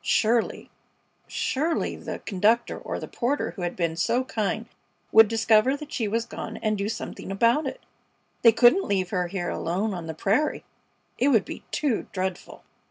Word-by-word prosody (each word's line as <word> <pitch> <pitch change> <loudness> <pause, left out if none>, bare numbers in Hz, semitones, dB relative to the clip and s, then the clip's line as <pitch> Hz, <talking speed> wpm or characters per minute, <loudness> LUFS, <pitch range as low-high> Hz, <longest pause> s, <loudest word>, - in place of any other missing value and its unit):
Surely, 230 +1 +1 0.6
surely 315 +5 -1
the - - -6
conductor, 220 +4 +2
or - - -5
the - - -6
porter 270 +4 -1
who 190 - -9
had 175 0 -2
been 170 -2 -1
so 235 +9 +1
kind, 220 -2 -2 0.5
would 225 0 +8
discover 225 +4 +3
that 300 0 -10
she 225 -5 -1
was 230 +3 -1
gone, - - -7
and 215 -1 0
do 200 0 -2
something 220 -3 -6
about 235 +9 +2
it. - - -5 0.6
They 230 - +8
couldn't 245 - +5
leave 185 -3 0
her 180 -3 0
here 175 0 -3
alone 195 +6 -1
on 175 -3 -6
the 160 - -5
prairie! 225 - 0 0.6
It 260 - +3
would 230 -8 +4
be - - -8
too 280 -7 -1
dreadful! 185 -1 -4
220 Hz, 170 wpm, -25 LUFS, 190-240 Hz, 0.6 s, would